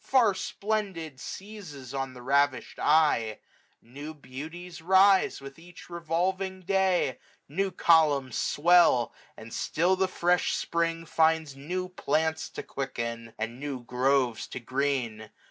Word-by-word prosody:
Far 240 -6 +4
splendid, 190 -9 -3
seizes 170 - -8
on 135 -1 -3
the 125 - -11
ravish'd 140 -1 +1
eye. 150 -8 +3 0.5
660 - - -25
New 145 +4 -7
beauties 160 +6 -9
rise 190 +2 +4
with 135 +2 -11
each 175 +1 -14
revolving 185 +3 -1
day; 185 -7 +1 0.3
New 195 +7 -1
columns 150 -8 +3
swell; 165 -6 +4 0.2
and 110 +1 -10
still 180 +4 +1
the 190 0 +1
fresh 180 -1 +1
Spring 165 0 -1
finds 160 -3 +2
New 180 +7 -4
plants 160 -3 -1
to - - -7
quicken, 115 -4 -5
and 115 +3 -4
new 140 -3 -5
groves 125 -1 +1
to - - -6
green. 125 -4 -2
155 Hz, 130 wpm, -28 LUFS, 130-180 Hz, 0.5 s, Far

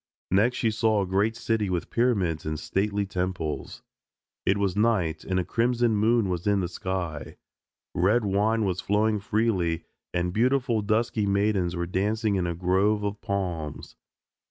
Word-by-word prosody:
Next 110 +7 +3
she 115 - +1
saw 110 -2 +2
a - - -2
great 100 +4 +1
city 115 -3 -1
with 90 -2 -2
pyramids 100 -10 +1
and 75 -1 -3
stately 100 +4 -1
temples. 90 -5 -4 0.6
It 95 - +3
was 100 -2 0
night, 100 -8 +1
and 95 -1 -1
a 90 - -1
crimson 120 -1 +1
moon 110 +1 +3
was 90 0 -3
in 100 -1 +3
the 90 - -1
sky. 85 -5 -4 0.6
Red 105 +6 +2
wine 105 +3 +1
was 90 -2 -1
flowing 105 +1 +1
freely, 100 -5 0 0.3
and 90 0 -1
beautiful 120 0 +2
dusky 110 0 0
maidens 100 -3 +1
were 85 0 -1
dancing 105 +4 0
in 90 -3 0
a 85 - -2
grove 95 +4 +1
of 100 0 -3
palms. 90 -7 -4
100 Hz, 155 wpm, -26 LUFS, 90-110 Hz, 0.6 s, Next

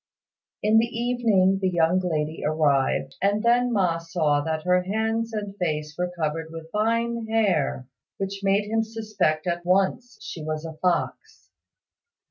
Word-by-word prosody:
In 215 +1 +5
the 230 - +2
evening 230 -6 +2
the 190 - +2
young 175 +1 +2
lady 160 -3 -2
arrived, 140 -3 +1
and 205 +2 +1
then 245 +1 +3
Ma 180 -6 +1
saw 160 -3 0
that 160 0 -2
her 180 0 +3
hands 220 +4 -1
and 205 -2 -4
face 150 -4 -2
were 180 0 -2
covered 160 +1 -1
with 165 0 -9
fine 230 +2 0
hair, 190 - +1 0.3
which 195 0 -4
made 200 +1 +2
him 225 +1 +1
suspect 215 -8 -1
at 175 -1 -2
once 195 +7 +1
she 160 - -7
was 155 +1 -3
a 160 - -6
fox. 175 +3 -2
185 Hz, 150 wpm, -25 LUFS, 160-220 Hz, 0.3 s, In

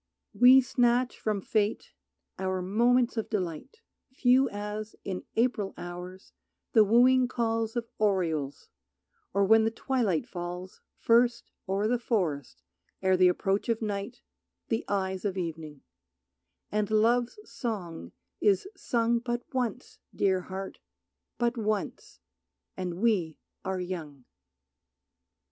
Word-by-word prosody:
We 255 +2 +8
snatch 245 0 +1
from 210 -2 -1
Fate 210 +2 -1 0.5
our 185 -1 -1
moments 240 +5 +2
of 225 - -2
delight, 190 - -4 0.3
Few 260 0 +3
as, 210 +1 -5
in 185 -2 -5
April 225 -4 0
hours, 180 +2 -8 0.4
the 220 -4 +7
wooing 250 +4 +5
calls 225 -2 -1
Of 235 -1 -2
orioles, 165 -9 0 0.6
or 200 0 +2
when 220 +2 +6
the 225 - +2
twilight 225 - -1
falls 180 +1 -7 0.2
First 235 +1 +2 0.2
o'er 200 +2 +1
the 245 +1 +1
forest 160 - -2 0.4
ere 190 0 +4
the 185 0 +5
approach 195 +4 0
of 230 -1 +1
night 210 +2 -4 0.5
The 225 -1 0
eyes 190 -2 -1
of 195 -2 -2
evening; 160 -4 -5 0.9
and 210 -1 0
Love's 235 - +2
song 180 - -5 0.3
is 205 - +3
sung 235 -7 +1
But 240 0 -3
once, 250 -5 -3 0.2
Dear 190 -2 +2
Heart, 190 +2 -7 0.6
but 240 0 0
once, 215 -2 -3 0.6
and 180 -2 -4
we 180 -9 +1 0.3
are 190 -1 -2
young. 160 -8 -6
210 Hz, 120 wpm, -28 LUFS, 185-235 Hz, 0.9 s, We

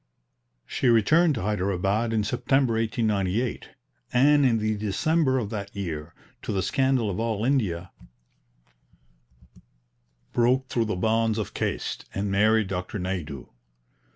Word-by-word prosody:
She - - -1
returned 150 +8 +4
to 110 - -4
Hyderabad 100 +2 0
in 110 -2 +1
September 125 +3 +1
1898, 110 0 -1 0.4
and 140 +2 +5
in 115 -2 +2
the 110 0 0
December 130 - +1
of 110 -5 -3
that 100 -2 -6
year, 80 -5 -5 0.3
to - - -4
the 95 -2 0
scandal 130 +1 +1
of 90 - -4
all 110 -1 -1
India, 100 -10 0 2.4
broke 130 +2 +2
through 115 -2 0
the 110 - -2
bonds 110 +3 +1
of 110 - -4
caste, - - -3
and 100 0 -2
married 110 +2 +3
Dr. 90 +1 -4
Naidu. 90 -8 -5
110 Hz, 125 wpm, -25 LUFS, 100-125 Hz, 2.4 s, and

